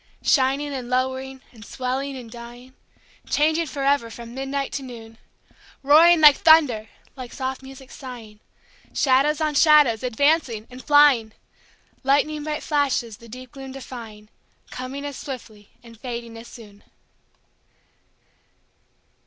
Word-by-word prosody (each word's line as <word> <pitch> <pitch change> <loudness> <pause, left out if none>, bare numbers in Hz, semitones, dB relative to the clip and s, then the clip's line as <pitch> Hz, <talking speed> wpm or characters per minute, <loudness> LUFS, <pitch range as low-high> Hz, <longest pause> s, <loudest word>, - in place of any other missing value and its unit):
Shining 275 +1 +1
and 250 -3 -6
lowering 260 +1 -2
and 225 -3 -15
swelling 265 +3 -4
and 235 -3 -10
dying, 240 +2 -12 0.6
Changing 315 +2 +1
forever 275 -4 0
from 235 +1 -10
midnight 270 +1 -3
to 280 - -4
noon; 230 -3 -11 0.6
Roaring 320 +4 +6
like 295 -2 +8
thunder, 290 -10 +4 0.3
like 255 -3 -9
soft 265 0 -4
music 265 0 -13
sighing, 235 -6 -10 0.6
Shadows 280 +2 +2
on 310 -1 0
shadows 295 -7 +5
advancing 255 -2 +1
and 255 +1 -11
flying, 285 -7 +4 0.7
Lighning 290 +3 +1
bright 300 -1 -4
flashes 270 -7 -1
the 235 - -15
deep 255 +2 -11
gloom 270 -1 -9
defying, 225 -5 -10 0.4
Coming 260 +3 -6
as 285 -2 -6
swiftly 220 -6 -9
and 230 -2 -15
fading 235 -2 -6
as 225 +1 -11
soon. 205 -3 -14
260 Hz, 125 wpm, -23 LUFS, 235-285 Hz, 0.7 s, like